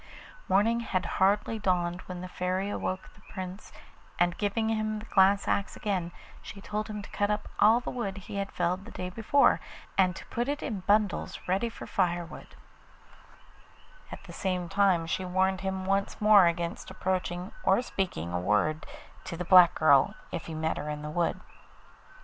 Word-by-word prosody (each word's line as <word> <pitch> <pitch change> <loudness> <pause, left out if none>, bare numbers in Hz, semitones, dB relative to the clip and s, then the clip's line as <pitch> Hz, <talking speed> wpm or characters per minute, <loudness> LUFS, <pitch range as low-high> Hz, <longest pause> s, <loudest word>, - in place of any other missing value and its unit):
Morning 215 +5 +3
had 190 -5 -2 0.2
hardly 205 +3 +2
dawned 180 -3 0
when 180 -1 -6
the 185 - -6
Fairy 185 +2 -2
awoke 185 -2 -3
the - - -21
Prince, 185 +1 -7 0.5
and 175 0 +2
giving 210 +3 -1
him 215 -1 -1
the 215 - -8
glass 195 -1 +3
axe 200 - 0
again 185 -5 -2 0.3
she 200 - -10
told 210 +1 -4
him 210 -2 -6
to - - -11
cut 205 0 0
up 210 0 -1
all 220 +3 +6
the 245 - -5
wood 205 -6 -4
he 195 +1 -7
had 200 0 -3
felled 180 +2 -1
the - - -10
day 180 -4 -6
before, 230 +8 +3 0.4
and 185 -2 +4
to - - -9
put 240 +2 -3
it 290 +1 -2
in 215 -6 -3
bundles 210 -1 +1
ready 195 +6 +1
for - - -9
firewood; 175 -2 -2 1.6
at - - -9
the - - -11
same 185 -2 -2
time 195 -3 +2
she 165 +3 -2
warned 185 +1 +1
him 190 -1 -3
once 195 +1 0
more 210 -4 +7
against 170 0 -3
approaching 180 0 -2
or 190 - +4
speaking 90 - -3
a 90 - 0
word 105 - 0 0.4
to 170 - -6
the 180 - -4
black 180 -2 +7
girl 140 -4 +4 0.2
if 170 - -5
he 160 - -6
met 160 +1 -1
her 150 - -4
in 150 0 -5
the 150 - -5
wood. 170 +1 0
190 Hz, 180 wpm, -29 LUFS, 175-205 Hz, 1.6 s, more